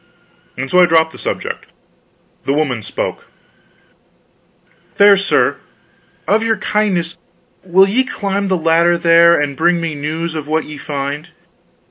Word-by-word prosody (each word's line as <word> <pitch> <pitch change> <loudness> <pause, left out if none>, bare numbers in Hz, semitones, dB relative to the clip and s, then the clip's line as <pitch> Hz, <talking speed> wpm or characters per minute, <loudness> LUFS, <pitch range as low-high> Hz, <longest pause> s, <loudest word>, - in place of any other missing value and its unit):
And 135 +1 -5
so 180 - +4
I 180 - +6
dropped 160 -1 +2
the - - -13
subject. - - -5 0.8
The 135 - 0
woman 140 -7 -1
spoke: - - -5 1.7
"Fair 200 0 +6
sir, 195 0 +1 0.7
of 215 +2 +2
your 225 -1 0
kindness 180 -5 -1 0.4
will 190 +1 +4
ye 240 +7 +1
climb 200 -5 -3
the 190 -1 +1
ladder 170 +1 +2
there, 170 0 +5
and 145 -1 -2
bring 170 +3 +2
me 165 -2 -3
news 155 +3 -4
of 155 -2 -6
what 155 +1 -1
ye 150 -1 -9
find? 145 +2 -5
170 Hz, 140 wpm, -16 LUFS, 155-190 Hz, 1.7 s, I